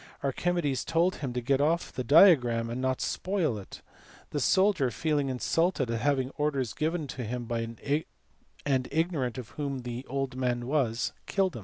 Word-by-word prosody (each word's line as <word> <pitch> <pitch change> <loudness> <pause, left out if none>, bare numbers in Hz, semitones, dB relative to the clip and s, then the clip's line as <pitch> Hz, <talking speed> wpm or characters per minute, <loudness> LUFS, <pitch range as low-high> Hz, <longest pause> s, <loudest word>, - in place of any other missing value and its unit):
Archimedes 145 0 0
told 170 +3 +1
him 135 -4 -4
to 125 0 -2
get 135 +3 +1
off 165 +4 +1
the 130 - -3
diagram, 125 - +5
and 125 +2 -3
not 130 0 0
spoil 185 - 0
it. 95 - -11 0.5
The 145 - -1
soldier, 185 -2 +3
feeling 145 0 0
insulted 135 +1 0
at 115 -1 -2
having 135 -2 +1
orders 140 -6 0
given 160 +1 -1
to 125 - -5
him 120 +1 -4 1.2
and 130 -3 +1
ignorant 150 -6 0
of 125 -3 -7
who 140 -3 -4
the 120 0 -5
old 135 -1 -2
man 125 -2 -1
was, 125 -4 0
killed 190 -6 +1
him. - - -5
135 Hz, 165 wpm, -29 LUFS, 125-160 Hz, 1.2 s, diagram